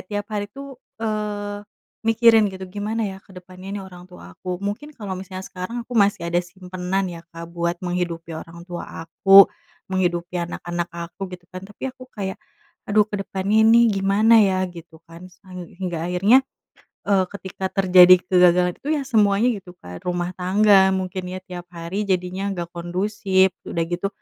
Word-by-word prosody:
tiap 205 -1 -3
hari 205 -1 -2
tuh, 275 +2 -11 0.2
eee, 210 -2 -3 0.5
mikirin 225 -1 +5
gitu 190 -1 -8
gimana 210 +3 -3
ya 190 -2 -5
ke 190 -1 -19
depannya 185 +1 -12
ini 205 - -4
orang 180 -1 -12
tua 180 - -13
aku 180 +1 -6
mungkin 255 +10 -5
kalau 195 -6 -6
misalnya 185 0 -7
sekarang 190 +6 -6
aku 235 - -25
masih 200 -3 +3
ada 175 - +2
simpanan 180 +1 -3
ya 170 - -8 0.2
Kak 170 0 -8
buat 170 0 -1
menghidupi 175 -2 -3
orang 170 +1 -11
tua 175 -1 -7 0.2
aku, 195 +4 +7 0.4
menghidupi 175 -2 -1
anak-anak 175 0 -3
aku 170 +3 -6
gitu 175 0 -16
kan 185 +1 -8
tapi 210 +6 -6
aku 255 0 -14
kayak 190 -3 -4 0.5
aduh 210 0 +4
ke 205 - -3
depan 190 0 -4
ini 225 +2 +6
gimana 200 +3 +4
ya? 190 -3 +3
Gitu 165 -2 -13
kan 170 +2 -11
sehingga 180 -2 -7
akhirnya, 205 +9 +4 0.6
eee, 195 -2 +2
ketika 190 -1 -5
terjadi 185 -1 +7
kegagalan 180 -1 +4
itu 285 - -6
ya 290 - -2
semuanya 220 -2 +3
gitu 185 -5 -8
kan 90 0 -9
rumah 175 0 -1
tangga 195 +1 +5
mungkin 185 0 -4
ya 185 +1 -5
tiap 175 -1 -9
hari 180 +5 -4
jadinya 185 +1 -1
gak 170 -1 -5
kondusif 190 +2 +1 0.2
udah 170 - -1
gitu 175 +3 -1
190 Hz, 165 wpm, -22 LUFS, 180-205 Hz, 0.6 s, aku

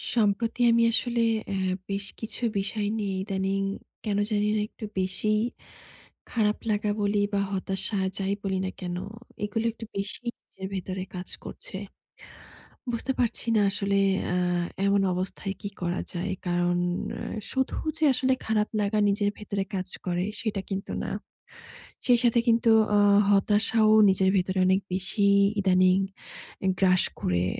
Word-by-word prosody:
সম্প্রতি 225 +2 +1
আমি 230 0 +4
আসলে 235 +1 0 0.3
অ্যাঁ 190 -1 0 0.2
বেশ 195 0 -2
কিছু 225 - -4 0.2
বিষয় 205 +1 -1
নিয়ে 200 -3 -2
ইদানিং 195 0 -1 0.4
কেন 205 -2 -1
জানিনা 210 0 +1
একটু 220 - -8
বেশিই 210 +3 0 0.9
খারাপ 210 -2 +1
লাগা 210 0 0
বলি 205 0 +1 0.2
বা 200 - +2
হতাশা 195 +1 -1 0.2
যাই 195 0 0
বলি 190 -1 -1
না - - -1
কেন। 180 -1 -3 0.5
এগুলো 225 +2 -2
একটু 225 - -9
বেশি 200 +4 -2 0.2
নিজের 190 0 -9
ভেতরে 185 0 -4
কাজ 180 0 -5 0.2
করছে। - - -8 1.2
বুঝতে 240 +3 -1
পারছি 235 -1 0
না - - +4
আসলে 200 0 0 0.3
অ্যাঁ 180 0 +1 0.3
এমন 200 0 +3
অবস্থায় 185 +2 -3
কি 200 - -4
করা 175 +1 -1
যায়। 185 +3 -2 0.2
কারণ 175 0 +1 0.4
অ্যাঁ - - -5 0.2
শুধু 265 -1 0 0.2
যে 315 - -1
আসলে 260 +1 +2
খারাপ 215 -1 +1
লাগা 205 +1 +1
নিজের 205 0 +2
ভেতরে 200 -2 -3
কাজ 185 0 -3 0.2
করে 175 -1 0 0.2
সেটা 215 -4 -2
কিন্তু 195 -1 -4
না। - - -3 1.0
সেই 245 -1 +5
সাথে 235 -1 +4
কিন্তু 230 0 +4 0.3
আ - - +5 0.3
হতাশাও 215 +2 +3 0.2
নিজের 190 0 +3
ভেতরে 185 +1 0
অনেক 190 +1 +4
বেশি 190 +2 0 0.3
ইদানিং 185 -1 +4 0.7
এ - - +3
গ্রাস 185 -2 +4 0.2
করে 90 0 +1
200 Hz, 145 wpm, -27 LUFS, 190-215 Hz, 1.2 s, সেই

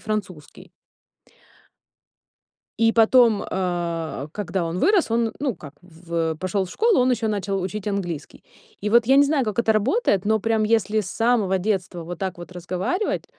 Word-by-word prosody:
французский. 195 -8 -6 2.1
И 225 0 +3
потом, 230 -1 +4
э, 170 -5 -3
когда 190 -3 -3
он 165 +2 -3
вырос, 370 - +2
он 230 -1 +1
ну 270 -6 -1
как 145 -3 -11
в 165 -2 -4
пошел 185 +3 -1
в 180 - -11
школу, 450 - +2
он 250 +1 +3
ещё 230 -2 0
начал 200 -2 -2
учить 195 +3 -4
английский. 175 -7 -5 0.4
И 210 - -2
вот 235 +2 +4
я 265 +2 +5
не 285 - +7
знаю, 285 -2 +1
как 215 0 -4
это 230 -2 +3
работает, 215 - +1
но 220 +1 +2
прям 225 +1 0
если 215 -1 +1
с 185 -3 -6
самого 225 -5 +1
детства 185 -3 -2
вот 175 0 -7
так 190 -1 -4
вот 175 +1 -10
разговаривать, 185 - -2
200 Hz, 165 wpm, -23 LUFS, 180-225 Hz, 2.1 s, не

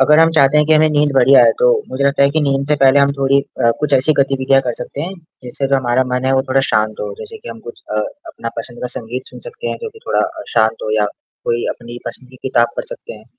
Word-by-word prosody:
अगर 150 +3 +5
हम 165 0 +5
चाहते 140 -1 +4
हैं 150 0 +4
कि 160 - +3
हमें 155 0 +5
नींद 150 -1 +2
बढ़िया 135 0 +6
आए - - +6
तो - - +3 0.2
मुझे 140 +2 -2
लगता 140 0 +2
है 140 - +4
कि 155 +2 0
नींद 140 -1 0
से 150 - +2
पहले 135 +1 +6
हम 140 0 +3
थोड़ी 140 0 +2 0.3
अ, 115 - +5
कुछ 150 -1 -1
ऐसी 135 +4 +3
गतिविधियाँ 135 0 +2
कर 120 - 0
सकते 140 - -7
हैं 175 +5 -4 0.3
जिससे 125 +2 -3
तो 135 - +1
हमारा 130 0 +1
मन 125 +1 -1
है 135 - +2
वो 130 - +2
थोड़ा 135 0 +1
शांत 110 0 +1
हो। 105 -1 -4
जैसे 110 - -9
कि - - -11
हम 115 -1 -8
कुछ 120 - -10
अ, 105 - -1 0.3
अपना 315 - -6
पसंद 120 +1 -7
का - - -2
संगीत 120 +3 -5
सुन - - -10
सकते 475 -1 -8
हैं - - -3
जो 460 - -3
कि 445 - -16
थोड़ा - - +1
अ, 335 -1 -3
शांत 110 -1 +2
हो 110 - -3
या 105 - +2 0.4
कोई 120 0 -1
अपनी 120 0 -9
पसंदीदा 130 +2 -9
किताब 120 -2 +3
पढ़ - - -3
सकते - - -9
हैं। - - -14
135 Hz, 275 wpm, -17 LUFS, 120-150 Hz, 0.4 s, बढ़िया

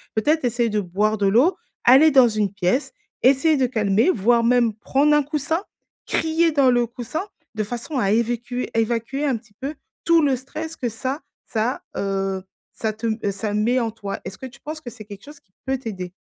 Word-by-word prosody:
Peut-être 295 +6 +2
essayer 240 -1 +1
de 210 0 0
boire 205 +4 0
de 200 - 0
l'eau, 265 - +4 0.3
aller 275 +6 +7
dans 260 -3 +7
une 210 -3 -1
pièce, 200 +7 0 0.3
essayer 275 +5 +4
de 265 - +3
calmer, 220 - +2
voire 235 - +3
même 235 -1 +3
prendre 275 +7 +2
un 295 - +3
coussin? 305 +4 -2 0.4
Crier 325 +1 +1
dans 280 -4 +4
le 240 -1 +3
coussin? 245 +8 -5 0.3
De 215 - 0
façon 240 +7 -5
à 195 -3 +1
évacuer- 240 +2 -1
évacuer 230 +5 0
un 265 -5 +1
petit 220 -2 -19
peu 285 +3 -4 0.3
tout 335 -1 +5
le 280 -3 +3
stress 310 +6 -7
que 245 - -2
ça 260 +7 -4 0.3
ça, 230 +3 -1 0.2
heu, 195 -1 -1 0.3
ça 220 -1 -2
te 225 +2 -4 0.2
ça 205 +2 -4
met 225 +5 +2
en 230 -2 -1
toi. 205 -3 -6
Est-ce 190 +1 -7
que - - -8
tu 260 +2 -16
penses 310 +1 -6
que 245 - -7
c'est 230 -3 -12
quelque 200 -1 -11
chose 295 +1 -13
qui 185 - -44
peut 265 0 0
t'aider? 190 -8 -6
240 Hz, 200 wpm, -22 LUFS, 215-275 Hz, 0.4 s, aller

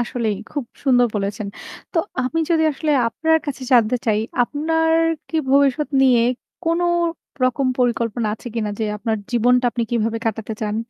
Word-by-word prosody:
আসলেই 235 -3 -1
খুব 285 -4 -3 0.2
সুন্দর 245 -2 +4
বলেছেন। 200 +1 -2 0.5
তো 340 - +1 0.2
আমি 255 +6 -1
যদি 325 -1 +3
আসলে 300 +2 -2 0.2
আপনার 320 +7 +2
কাছে 275 -2 -4
জানতে 240 0 +4
চাই 215 -1 +2 0.2
আপনার 320 +5 0 0.4
কি 325 - -3
ভবিষ্যৎ 280 +1 +3
নিয়ে 250 -3 +5 0.4
কোন 335 +1 +1 0.6
রকম 255 +2 +1
পরিকল্পনা 235 -2 0
আছে 235 - -16
কিনা? 215 -2 -1
যে 220 - 0
আপনার 220 +1 -1
জীবনটা 245 +1 +3
আপনি 235 +2 -2
কিভাবে 225 -1 0
কাটাতে 220 0 -2
চান? 210 0 -2
245 Hz, 155 wpm, -21 LUFS, 225-280 Hz, 0.6 s, নিয়ে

